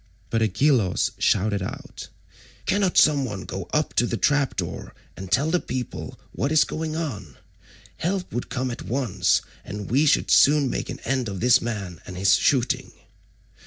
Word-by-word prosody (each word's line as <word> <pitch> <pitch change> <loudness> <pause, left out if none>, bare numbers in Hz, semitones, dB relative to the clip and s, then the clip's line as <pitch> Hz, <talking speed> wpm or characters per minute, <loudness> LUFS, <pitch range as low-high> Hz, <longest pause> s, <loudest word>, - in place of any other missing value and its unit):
But 115 - +1
Agelaus 110 -1 +2
shouted 100 0 +1
out, 95 - -7 0.6
"Cannot 195 -2 +1
some 145 -2 +5
one 105 -7 -5
go 95 -2 -6
up 150 0 0
to 120 - +3
the 115 - -2
trap 145 0 +1
door - - -5 0.2
and 95 -1 -9
tell 140 +9 +2
the 180 - +2
people 130 -6 -6
what 140 - -2
is 155 -1 +5
going 155 -1 -4
on? 105 - -5 0.6
Help 185 +2 -2
would 120 - -3
come 125 0 -2
at 120 - -6
once, 120 -5 0 0.2
and 105 0 -7
we 145 +5 +3
should - - +2
soon 145 -2 +5
make - - -3
an - - -6
end 130 -4 -1
of 95 -2 -5
this 125 +3 +4
man 100 -7 -5
and 90 - -8
his 95 0 +4
shooting." 130 -3 +1
125 Hz, 170 wpm, -24 LUFS, 100-145 Hz, 0.6 s, some